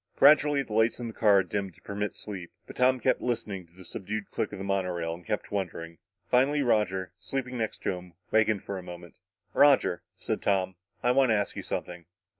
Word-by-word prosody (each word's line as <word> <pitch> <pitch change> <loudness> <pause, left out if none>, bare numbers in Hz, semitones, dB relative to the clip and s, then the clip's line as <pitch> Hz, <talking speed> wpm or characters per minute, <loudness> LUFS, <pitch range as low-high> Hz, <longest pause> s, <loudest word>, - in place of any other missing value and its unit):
Gradually, 145 0 +6
the 110 - -9
lights 110 +2 +3
in 120 - -4
the - - -8
cars 100 -4 +4
dimmed 100 -4 -3
to - - -22
permit 105 0 -3
sleep. 95 -5 -7
But - - -11
Tom 130 0 +4
kept - - +2
listening 105 -7 -3
to 85 - -29
the 95 - -12
subdued 100 +3 -5
click - - -2
of - - -6
the 95 - -5
monorail 90 -4 -1
and 85 +1 -10
kept 105 +1 -3
wondering. 85 -4 -4 0.3
Finally 140 +4 +3
Roger, 95 -7 +1
sleeping 130 +2 -3
next 110 - -3
to - - +1
him, 90 -1 -8 0.2
wakened 110 -2 +3
for 100 -1 -4
a - - -7
moment. 85 -1 -11 0.3
"Roger," 140 -11 +5 0.2
said - - -3
Tom, 95 -2 +1 0.3
"I 125 - +4
want 130 0 +4
to 110 - +4
ask 100 -1 -1
you - - -4
something." 85 -1 -5
105 Hz, 210 wpm, -28 LUFS, 90-120 Hz, 0.3 s, Gradually